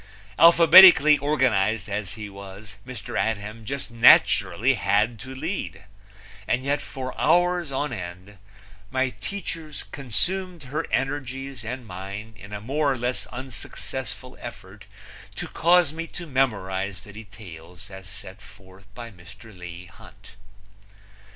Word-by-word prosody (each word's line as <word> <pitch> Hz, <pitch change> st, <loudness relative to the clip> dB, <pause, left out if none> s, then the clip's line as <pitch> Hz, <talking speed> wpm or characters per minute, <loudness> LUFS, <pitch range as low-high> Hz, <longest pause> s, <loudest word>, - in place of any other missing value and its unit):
Alphabetically 165 Hz, -2 st, +8 dB
organized 120 Hz, -8 st, +1 dB
as 100 Hz, -2 st, -4 dB
he 105 Hz, 0 st, -7 dB
was, 100 Hz, +1 st, -11 dB
Mr. 125 Hz, -4 st, -8 dB
Adhem 110 Hz, 0 st, -4 dB
just 140 Hz, +1 st, -5 dB
naturally 120 Hz, +1 st, +5 dB
had 105 Hz, +1 st, +1 dB
to 130 Hz, +4 st, -9 dB
lead; 160 Hz, -, -5 dB, 0.6 s
and 125 Hz, -, 0 dB
yet 140 Hz, +2 st, 0 dB
for 130 Hz, -2 st, -6 dB
hours 175 Hz, -3 st, +2 dB
on 135 Hz, 0 st, -2 dB
end 95 Hz, 0 st, -8 dB, 0.5 s
my 130 Hz, +1 st, 0 dB
teaches 160 Hz, -, -7 dB
consumed 165 Hz, -, -2 dB
her 150 Hz, +5 st, -4 dB
energies 135 Hz, -2 st, -3 dB
and 125 Hz, +2 st, -6 dB
mine 100 Hz, +3 st, -8 dB
in 100 Hz, +1 st, -13 dB
a 105 Hz, -, -5 dB
more 140 Hz, +6 st, 0 dB
or 130 Hz, -, -2 dB
less 125 Hz, +1 st, -2 dB
unsuccessful 125 Hz, -4 st, -7 dB
effort -, -, -11 dB, 0.5 s
to -, -, -5 dB
cause 170 Hz, -2 st, +3 dB
me 165 Hz, +1 st, -5 dB
to 175 Hz, -, -8 dB
memorize 100 Hz, -, -1 dB
the 105 Hz, +1 st, -14 dB
details 100 Hz, -4 st, -12 dB
as 95 Hz, 0 st, -11 dB
set 100 Hz, -1 st, -11 dB
forth 100 Hz, -2 st, -17 dB
by 120 Hz, -1 st, -8 dB
Mr. 100 Hz, +4 st, -15 dB
Leigh 90 Hz, 0 st, -9 dB
Hunt. 90 Hz, -, -17 dB
115 Hz, 130 wpm, -24 LUFS, 100-140 Hz, 0.6 s, Alphabetically